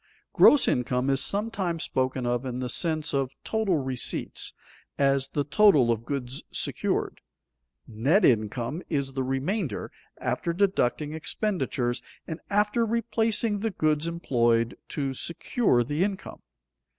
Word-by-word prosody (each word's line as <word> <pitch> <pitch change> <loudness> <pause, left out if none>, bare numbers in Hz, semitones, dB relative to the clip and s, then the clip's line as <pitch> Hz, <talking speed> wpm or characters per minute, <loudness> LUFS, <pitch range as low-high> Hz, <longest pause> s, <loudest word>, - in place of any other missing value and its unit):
_ - - -55
Gross 290 - +6
income 125 +2 +1
is 135 0 +4
sometimes 200 -5 -1
spoken 130 -1 -1
of 120 +1 0
in 125 -2 -4
the 125 -1 -3
sense 155 +2 +1
of 135 -2 -1
total 220 -6 0
receipts, 130 -3 -1 0.5
as 135 -1 +2
the 145 +1 -1
total 145 - +4
of 115 0 -2
goods 135 -2 -4
secured; - - -2 0.7
net 135 - +2
income 120 - +1
is 140 -4 -1
the 135 - -2
remainder 135 - -2 0.3
after 170 - -2
deducting 160 -6 0
expenditures 145 - -2 0.2
and 160 +1 -6
after 210 +3 +2
replacing 225 -2 0
the 225 +2 -1
goods 155 -4 0
employed 120 -8 +1
to 140 -3 -3
secure 170 - 0
the 145 +8 -1
income. 200 0 -4
145 Hz, 130 wpm, -26 LUFS, 130-195 Hz, 0.7 s, Gross